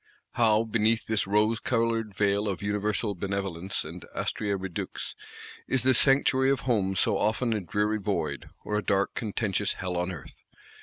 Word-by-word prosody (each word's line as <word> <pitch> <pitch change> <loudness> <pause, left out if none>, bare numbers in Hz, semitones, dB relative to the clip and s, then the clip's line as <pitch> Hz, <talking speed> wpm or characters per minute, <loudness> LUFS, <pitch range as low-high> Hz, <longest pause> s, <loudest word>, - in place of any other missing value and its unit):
How, 110 -2 +3
beneath 110 0 +1
this 110 -3 0
rose 105 +3 +2
coloured 115 -3 0
veil 100 +1 +1
of 100 -1 -3
Universal 105 +1 -1
Benevolence 95 -2 -3
and 85 +3 -8
Astræa 100 -2 -1
Redux, 95 -2 -5 0.5
is 130 - +1
the 130 0 +5
sanctuary 135 0 +4
of 135 - +1
Home 100 -6 +1
so - - +2
often 110 +2 +1
a 110 - 0
dreary 105 +4 0
void, 85 -9 -2
or 105 0 -1
a - - -5
dark 100 0 +1
contentious 105 -2 -1
Hell 90 -1 -4
on 90 +1 -1
Earth! 80 -7 -11
105 Hz, 160 wpm, -28 LUFS, 95-115 Hz, 0.5 s, the